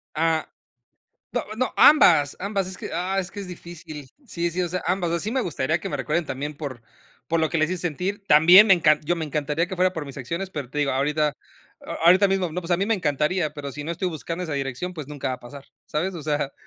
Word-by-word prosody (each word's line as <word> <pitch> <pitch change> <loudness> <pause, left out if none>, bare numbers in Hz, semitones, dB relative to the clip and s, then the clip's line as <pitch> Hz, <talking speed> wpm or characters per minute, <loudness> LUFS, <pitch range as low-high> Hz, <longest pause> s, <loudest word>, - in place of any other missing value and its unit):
Ah. 160 0 +1 0.9
No, - - 0
no, 255 +2 -1
ambas, 160 - +6
ambas. 200 -1 -1
Es 185 0 -7
que, - - -7
ah, 190 +2 -1
es 185 -1 -2
que 205 - -7
es 195 - -7
difícil. 170 -5 -9 0.2
Sí, 170 -5 -2
sí, 175 +2 -3
o 175 - 0
sea, 180 +1 -3
ambas. 175 -2 0
Sí 215 - -3
me 265 - +1
gustaría, 160 - -1
que - - -5
me 145 - -3
recuerden 150 +6 -1
también, 145 +3 -4
por 135 -6 -7 0.5
por 165 0 +1
lo 160 - +2
que 165 - -2
les 155 +1 +1
hice 185 -2 -2
sentir. 180 +5 -3
También 175 +7 +8
me 195 - +7
encan 155 -3 +3
yo, 175 +4 0
me 160 - -3
encantaría 150 +2 -1
que 190 - -5
fuera 185 +1 +2
por 160 - -4
mis 140 -1 -9
acciones, 170 +9 -4
pero 145 -8 -5
te 140 - -11
digo, 145 -2 +1
ahorita 150 +3 +1 0.7
ahorita 185 +4 +6
mismo, 190 -4 0
no. 180 - -3
Pues 170 0 -8
a 175 - +4
mí 195 - 0
me 225 - 0
encantaría, 150 -1 0
pero 140 -2 -6
si 150 - -6
no 160 - -5
estoy 180 +2 -2
buscando 165 +2 -5
esa 160 - -5
dirección, 135 +5 -3
pues 155 -5 -8
nunca 145 -2 -4
va 130 - -1
a - - -12
pasar, 135 +3 -11 0.2
¿sabes? 180 +5 -2
O 165 - -7
sea 145 -2 -1
165 Hz, 250 wpm, -24 LUFS, 150-180 Hz, 0.9 s, También